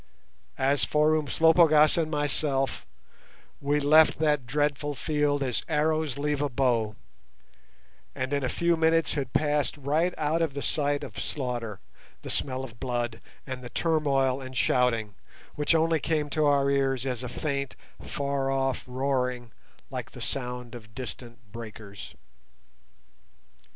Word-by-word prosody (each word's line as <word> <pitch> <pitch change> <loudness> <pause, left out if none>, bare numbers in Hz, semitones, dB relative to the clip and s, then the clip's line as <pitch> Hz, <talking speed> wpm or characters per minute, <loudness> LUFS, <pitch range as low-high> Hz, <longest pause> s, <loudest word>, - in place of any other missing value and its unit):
As 135 +2 +2
for 150 +1 +3
Umslopogaas 155 0 +5
and 165 -2 0
myself, 145 -2 0 0.7
we 145 +1 +1
left 155 +2 +5
that 150 -5 +1
dreadful 145 +2 0
field 145 0 0
as 125 -3 -1
arrows 155 -2 +1
leave 145 0 -1
a 145 - 0
bow, 120 -5 +1 1.2
and 130 +2 -3
in 140 -1 0
a 130 - 0
few 170 +4 +2
minutes 165 -1 +2
had 135 -4 -3
passed 150 0 +1
right 155 +6 0
out 155 +2 0
of 155 -4 -1
the 140 - -3
sight 145 -1 +1
of - - -7
slaughter, 120 -7 -3 0.4
the - - -3
smell 130 -1 0
of 115 -3 -10
blood, 120 -3 -2 0.2
and 130 -1 -6
the 120 - -7
turmoil 140 -5 +1
and 130 -1 -7
shouting, 115 -4 +2 0.4
which 150 +3 +1
only 160 0 +3
came 150 -1 -1
to 155 -1 +1
our 140 -1 +3
ears 135 -2 +1
as 125 -3 -2
a 125 - -5
faint, 140 +1 -3 0.3
far 140 -1 -2
off 135 -1 0
roaring 125 -2 -1 0.4
like - - -5
the - - -10
sound 125 -2 -3
of 110 -2 -11
distant 120 -1 -8
breakers. 110 -3 -9
140 Hz, 140 wpm, -27 LUFS, 125-150 Hz, 1.2 s, Umslopogaas